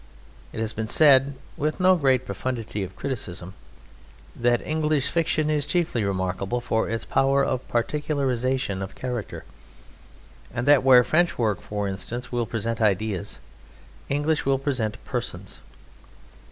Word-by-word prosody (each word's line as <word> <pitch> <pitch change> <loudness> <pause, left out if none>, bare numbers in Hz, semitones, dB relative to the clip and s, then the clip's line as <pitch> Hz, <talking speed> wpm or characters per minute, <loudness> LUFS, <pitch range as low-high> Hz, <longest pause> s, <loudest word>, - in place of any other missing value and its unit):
It - - -6
has 110 -1 -2
been 110 0 -3
said 140 +1 +5 0.2
(with 155 +4 -2
no 185 0 +5
great 135 -6 +2
profundity 110 +1 -4
of 95 -1 -6
criticism) 95 -9 -5 0.8
that 120 0 +1
English 155 -2 0
fiction 160 -2 +1
is 150 -1 +1
chiefly 160 -11 0
remarkable 95 +3 -1
for 115 -2 -1
its 115 0 -3
power 135 0 +2
of 130 -1 -2
particularization 130 -4 -1
of 95 - -6
character, 125 -4 -5 1.1
and 120 +2 -3
that 145 -3 +7
where 130 -2 +7
French 175 +6 +2
work, 110 -4 0
for 105 -1 -3
instance, 115 +6 -5
will 120 -2 -1
present 115 +1 -3
ideas, 100 -1 0 0.7
English 150 +2 0
will 135 0 +2
present 130 -6 -2
persons. - - -5
125 Hz, 135 wpm, -25 LUFS, 110-140 Hz, 1.1 s, that